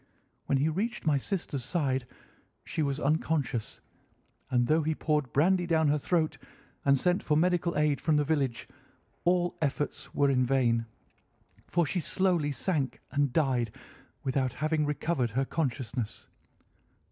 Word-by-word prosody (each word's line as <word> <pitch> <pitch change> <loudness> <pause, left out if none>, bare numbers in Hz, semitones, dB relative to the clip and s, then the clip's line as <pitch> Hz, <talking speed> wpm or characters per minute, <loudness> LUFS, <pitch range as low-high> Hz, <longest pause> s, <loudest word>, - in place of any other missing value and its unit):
When 140 - +2
he 140 +3 +2
reached 210 +8 -2
my 150 -3 +3
sister's 150 -6 -3
side 135 -7 -1 0.6
she - - -2
was 140 -1 0
unconscious, 145 -5 -1 0.7
and 120 -1 +2
though 155 +5 +3
he 155 +1 0
poured 150 -6 0
brandy 175 +4 +3
down 160 -3 +3
her 150 +1 +2
throat 160 +1 0 0.4
and 140 0 +4
sent 180 +4 +2
for 150 - +1
medical 175 0 +1
aid 150 -2 +2
from 155 - +2
the 150 - +3
village, 140 -5 -1 0.6
all 175 0 +2
efforts 145 -1 -2
were 140 -1 +2
in 130 -1 +3
vain, 120 -3 +2 0.8
for 170 -1 +2
she 180 +5 -1
slowly 175 -3 +1
sank 145 -2 -1
and 145 -2 +1
died 125 -7 +1 0.5
without 130 -2 0
having 155 0 0
recovered 145 -3 0
her 130 +5 0
consciousness. 125 -6 -3
150 Hz, 145 wpm, -29 LUFS, 135-160 Hz, 0.8 s, and